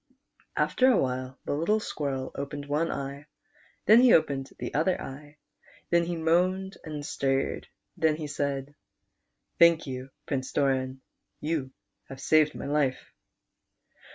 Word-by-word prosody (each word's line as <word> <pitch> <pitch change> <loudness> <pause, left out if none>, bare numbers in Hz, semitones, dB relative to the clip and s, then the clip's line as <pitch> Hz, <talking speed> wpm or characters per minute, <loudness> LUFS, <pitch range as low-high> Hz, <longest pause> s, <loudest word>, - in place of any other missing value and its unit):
After 255 - +3
a - - +4
while 130 +1 -2
the - - -1
little 170 +9 +2
Squirrel 135 -9 -3
opened 140 0 -5
one 150 +3 0
e\'e, 140 -1 -5 0.6
then 220 +3 +8
he 250 -2 +7
opened 140 -4 +1
the - - -5
other 165 +5 +1
eye, 145 +2 -9 0.5
then 170 0 +4
he 175 0 -2
moaned 180 +4 +1
and 150 -3 -6
stirred; 135 -1 -1 0.3
then 160 -1 +2
he 155 0 -5
said: 140 -1 -3 0.9
"Thank 170 -1 +6
you, 130 -1 -6 0.2
Prince 130 -2 -3
Doran, 130 -1 0 0.4
you 150 -4 -2 0.4
have 135 - -8
saved 155 +2 +3
my - - -6
life." 140 -2 -1
145 Hz, 135 wpm, -28 LUFS, 135-165 Hz, 0.9 s, then